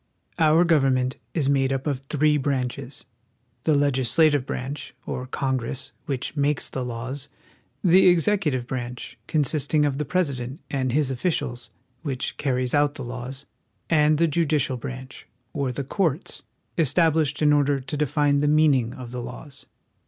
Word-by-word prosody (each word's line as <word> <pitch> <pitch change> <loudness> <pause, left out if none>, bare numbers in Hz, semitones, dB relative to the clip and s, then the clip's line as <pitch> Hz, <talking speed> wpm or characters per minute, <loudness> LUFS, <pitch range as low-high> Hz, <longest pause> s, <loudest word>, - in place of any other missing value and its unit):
Our 160 +1 +5
government 135 -5 +2 0.2
is 150 -5 +1
made 135 -1 +2
up 135 0 -2
of 140 -4 -1
three 150 +2 +1
branches: 130 -2 -3 0.6
the 155 - +4
leg 140 -1 +3
islative 145 +2 +3
branch, 135 +3 -5
or 125 0 -4
Congress, 130 0 -2 0.2
which 135 +1 -3
makes 145 0 +1
the 130 - -3
laws; 125 +4 -4 0.5
the 185 +1 +6
executive 170 -7 +2
branch, 125 -1 -6
consisting 150 0 +2
of 140 -1 -1
the - - +1
President 140 -5 -1
and 130 -2 0
his 140 0 +1
offi 130 +8 0
cials, 120 -7 -3 0.3
which 135 -6 -3
car 135 -3 0
ries 125 -1 -1
out 145 0 +3
the 135 - -6
laws; 125 +3 -6 0.5
and 150 -1 +4
the 165 +2 +3
judicial 150 -4 +1
branch, 130 0 -8 0.3
or 140 -3 -1
the 140 +3 -4
courts, 160 +2 -1 0.4
estab 165 +1 +4
lished 150 -2 0
in 150 0 +5
order 145 -1 +3
to 135 +3 -6
define 145 0 +2
the 145 - +1
meaning 145 -6 +3
of 125 -2 -8
the 125 0 -4
laws. 140 +3 -9
140 Hz, 160 wpm, -24 LUFS, 130-150 Hz, 0.6 s, the